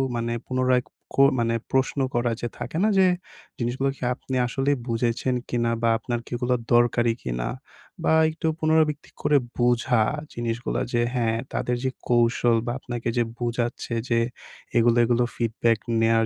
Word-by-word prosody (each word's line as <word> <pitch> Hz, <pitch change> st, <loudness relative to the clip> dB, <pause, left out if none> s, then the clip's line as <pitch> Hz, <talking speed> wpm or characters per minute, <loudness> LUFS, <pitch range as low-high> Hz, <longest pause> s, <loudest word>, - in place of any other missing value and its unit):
মানে 115 Hz, 0 st, -1 dB, 0.2 s
পুনরায় 130 Hz, -1 st, +2 dB, 0.3 s
কো 135 Hz, -, +6 dB, 0.2 s
মানে 115 Hz, 0 st, +1 dB, 0.2 s
প্রশ্ন 135 Hz, +1 st, +1 dB
করা 120 Hz, 0 st, +1 dB
যে 120 Hz, -, -1 dB
থাকে -, -, -5 dB
না? -, -, +4 dB
যে 190 Hz, -, +6 dB, 0.5 s
জিনিসগুলো 125 Hz, +3 st, -1 dB
কি -, -, -22 dB
আপনি 130 Hz, 0 st, -6 dB
আসলেই 135 Hz, +3 st, 0 dB
বুঝেছেন 120 Hz, +2 st, 0 dB
কিনা 120 Hz, -1 st, +1 dB
বা 115 Hz, -, +3 dB
আপনার 120 Hz, +1 st, -3 dB
কিগুলো 125 Hz, +1 st, -1 dB, 0.2 s
দরকারি 120 Hz, -1 st, +4 dB
কিনা -, -, -3 dB, 0.6 s
বা -, -, +3 dB, 0.2 s
একটু 160 Hz, +1 st, -3 dB
পুনরাবৃত্তি 155 Hz, -1 st, +2 dB
করে 150 Hz, 0 st, +4 dB, 0.2 s
বুঝা 120 Hz, -1 st, +3 dB, 0.3 s
জিনিসগুলো 115 Hz, 0 st, -2 dB
যে 120 Hz, -, +3 dB
হ্যাঁ, 115 Hz, -3 st, +1 dB, 0.2 s
তাদের 125 Hz, -, 0 dB
যে 130 Hz, -, +1 dB, 0.2 s
কৌশল 120 Hz, 0 st, +3 dB
বা 120 Hz, -, -1 dB
আপনাকে 120 Hz, -2 st, -5 dB
যে 120 Hz, -, +4 dB
বুঝাচ্ছে 120 Hz, 0 st, -2 dB, 0.2 s
যে 115 Hz, -1 st, +3 dB, 0.6 s
এগুলো, 120 Hz, 0 st, +4 dB
এগুলো 120 Hz, +1 st, +2 dB
ফিডব্যাক 115 Hz, -1 st, +1 dB, 0.2 s
নেয়ার 115 Hz, 0 st, +3 dB
120 Hz, 150 wpm, -25 LUFS, 115-130 Hz, 0.6 s, কো